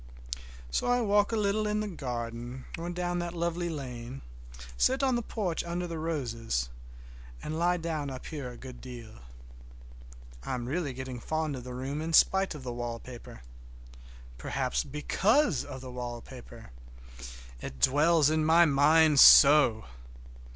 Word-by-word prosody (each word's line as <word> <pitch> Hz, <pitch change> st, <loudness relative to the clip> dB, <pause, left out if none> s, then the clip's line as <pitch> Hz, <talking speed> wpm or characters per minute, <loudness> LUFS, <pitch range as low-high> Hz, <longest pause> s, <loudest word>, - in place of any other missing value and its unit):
So -, -, 0 dB
I 245 Hz, 0 st, +3 dB
walk 205 Hz, -1 st, +2 dB
a -, -, 0 dB
little 210 Hz, 0 st, 0 dB
in 210 Hz, 0 st, 0 dB
the 215 Hz, -, -2 dB
garden 120 Hz, -, -6 dB
or 170 Hz, +1 st, -5 dB
down 175 Hz, 0 st, -2 dB
that 175 Hz, 0 st, -4 dB
lovely 170 Hz, +1 st, -2 dB
lane, 130 Hz, -4 st, -7 dB, 0.5 s
sit 265 Hz, +2 st, +2 dB
on 265 Hz, -1 st, +2 dB
the 240 Hz, -, 0 dB
porch 200 Hz, -7 st, -3 dB
under 175 Hz, +1 st, -3 dB
the 165 Hz, -2 st, -5 dB
roses, 115 Hz, -, -2 dB, 0.7 s
and 155 Hz, +1 st, -4 dB
lie 175 Hz, +1 st, +2 dB
down 160 Hz, -4 st, -3 dB
up 130 Hz, -1 st, -8 dB
here 145 Hz, -5 st, -6 dB
a 120 Hz, -, -11 dB
good 130 Hz, -2 st, -10 dB
deal. 120 Hz, -, -10 dB, 1.2 s
I'm 125 Hz, -3 st, -4 dB
getting 140 Hz, -1 st, -3 dB, 0.2 s
really -, -, -9 dB
fond 155 Hz, +1 st, -2 dB
of 125 Hz, -, -8 dB
the 125 Hz, -1 st, -7 dB
room 135 Hz, +4 st, -4 dB
in 165 Hz, +1 st, -4 dB
spite 190 Hz, +2 st, +4 dB
of 145 Hz, -, -9 dB
the 125 Hz, -1 st, -5 dB
wallpaper. 120 Hz, -, -7 dB, 1.0 s
Perhaps 130 Hz, -, -1 dB
because 170 Hz, -, +1 dB
of 130 Hz, -, -8 dB
the 130 Hz, -1 st, -8 dB
wallpaper. 120 Hz, -, -9 dB, 0.9 s
It 65 Hz, -, -8 dB
dwells 150 Hz, +2 st, +4 dB
in 155 Hz, 0 st, +1 dB
my 165 Hz, +2 st, +6 dB
mind 150 Hz, +1 st, +4 dB
so! 140 Hz, -7 st, +8 dB
150 Hz, 150 wpm, -29 LUFS, 125-175 Hz, 1.2 s, so